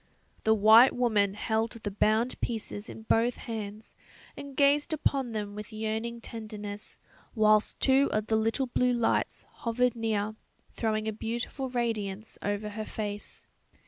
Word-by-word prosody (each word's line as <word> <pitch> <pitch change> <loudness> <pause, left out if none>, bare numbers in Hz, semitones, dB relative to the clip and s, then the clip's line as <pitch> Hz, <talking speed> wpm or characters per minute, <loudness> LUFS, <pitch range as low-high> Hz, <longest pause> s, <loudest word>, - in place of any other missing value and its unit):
The 220 0 +5
white 220 +4 +7
woman 210 -5 +2
held 220 +1 -1
the 220 -3 -5
bound 220 +4 +1
pieces 220 -2 -3
in 220 - -9
both 230 +2 +2
hands, 215 -2 -6 0.4
and 280 -2 -9
gazed 290 +2 +3
upon 275 -5 0
them 205 -2 -3
with 210 +2 -8
yearning 220 +2 -3
tenderness, 215 -2 -7 0.4
whilst 215 -1 +4
two 270 +1 +4
of 215 0 0
the 220 - +1
little 225 +5 +1
blue 250 0 +1
lights 235 -2 0
hovered 245 +1 +1
near, 215 -2 -1 0.4
throwing 215 -1 -1
a 220 - -1
beautiful 235 +5 -4
radiance 220 -4 -3
over 205 +1 -2
her 215 +1 -5
face. 205 -1 -5
220 Hz, 145 wpm, -29 LUFS, 210-240 Hz, 0.4 s, white